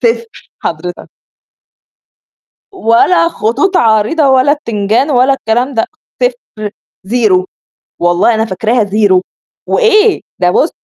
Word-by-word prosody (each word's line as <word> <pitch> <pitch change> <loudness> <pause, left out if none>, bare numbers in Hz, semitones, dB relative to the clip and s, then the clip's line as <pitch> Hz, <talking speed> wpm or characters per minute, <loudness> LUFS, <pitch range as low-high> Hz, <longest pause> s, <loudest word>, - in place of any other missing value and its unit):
0 230 -1 -3
حضرتك. 175 +2 -5 1.6
ولا 335 - +2
خطوط 340 - -1
عريضة 225 +7 +2
ولا 265 +2 +4
بتنجان 230 -1 -1
ولا 255 +1 +3
الكلام 250 +1 -1
ده، 225 - +1 0.4
0 475 - -3 0.4
0 210 -6 +2 0.6
والله 175 +6 +2
أنا 220 +1 0
فاكراها 220 +3 0
0 200 -2 +2 0.5
وإيه؟ 445 -3 +3 0.2
ده 180 -1 +2
بُصّ 305 - +2
230 Hz, 105 wpm, -12 LUFS, 210-285 Hz, 1.6 s, ولا